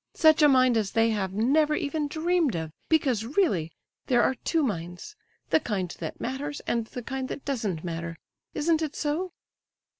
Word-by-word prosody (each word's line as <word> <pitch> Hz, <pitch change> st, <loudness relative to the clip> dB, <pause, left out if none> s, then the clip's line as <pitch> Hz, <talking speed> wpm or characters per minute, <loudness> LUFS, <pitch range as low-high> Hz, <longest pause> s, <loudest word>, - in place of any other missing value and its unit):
Such 315 Hz, -1 st, +5 dB
a 300 Hz, -, +8 dB
mind 255 Hz, -3 st, +5 dB
as 210 Hz, -3 st, 0 dB
they 225 Hz, 0 st, +3 dB
have 195 Hz, -3 st, -1 dB
never 290 Hz, +9 st, +2 dB
even 295 Hz, +1 st, -1 dB
dreamed 320 Hz, -, +1 dB
of; 160 Hz, -1 st, -3 dB, 0.2 s
because 265 Hz, -9 st, +2 dB
really, 225 Hz, -, +1 dB, 0.4 s
there 245 Hz, -2 st, +4 dB
are -, -, +3 dB
two 320 Hz, +5 st, 0 dB
minds—the 180 Hz, -, -3 dB
kind 190 Hz, -, -3 dB
that 160 Hz, -, -5 dB
matters, 285 Hz, +4 st, -4 dB
and 230 Hz, -2 st, -1 dB
the 245 Hz, -, -7 dB
kind 265 Hz, +2 st, -3 dB
that 280 Hz, -, -7 dB
doesn't 215 Hz, -, -2 dB
matter. 170 Hz, -1 st, -4 dB, 0.4 s
Isn't 320 Hz, +1 st, +2 dB
it 310 Hz, -2 st, -3 dB
so?" 330 Hz, +5 st, -2 dB
260 Hz, 170 wpm, -27 LUFS, 205-305 Hz, 0.4 s, a